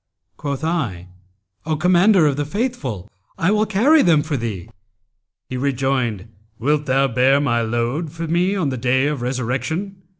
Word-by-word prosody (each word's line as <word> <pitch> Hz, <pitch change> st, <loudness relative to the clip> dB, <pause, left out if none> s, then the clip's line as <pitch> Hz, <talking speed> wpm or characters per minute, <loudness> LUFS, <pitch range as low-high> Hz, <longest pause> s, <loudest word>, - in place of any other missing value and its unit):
Quoth 140 Hz, 0 st, -4 dB
I, 120 Hz, -, -2 dB, 0.6 s
'O 155 Hz, -, +1 dB
Commander 180 Hz, +2 st, +4 dB
of 145 Hz, -2 st, +2 dB
the 145 Hz, -, -1 dB
Faithful, 145 Hz, -, -3 dB, 0.3 s
I 175 Hz, +4 st, +1 dB
will 215 Hz, 0 st, +2 dB
carry 260 Hz, +10 st, +4 dB
them 160 Hz, -5 st, +3 dB
for 155 Hz, -1 st, -3 dB
thee.' 110 Hz, -8 st, -4 dB, 0.8 s
He 130 Hz, -, -5 dB
rejoined, 130 Hz, -6 st, -1 dB, 0.3 s
'Wilt 145 Hz, +5 st, 0 dB
thou 135 Hz, +1 st, +3 dB
bear 130 Hz, +3 st, +3 dB
my 120 Hz, -5 st, +1 dB
load 120 Hz, +8 st, -2 dB
for 165 Hz, +1 st, -5 dB
me 175 Hz, +4 st, +1 dB
on 175 Hz, -8 st, 0 dB
the 130 Hz, -, -3 dB
Day 130 Hz, +3 st, +1 dB
of 145 Hz, -3 st, -2 dB
Resurrection?' 130 Hz, -, -3 dB
140 Hz, 160 wpm, -20 LUFS, 125-170 Hz, 0.8 s, Commander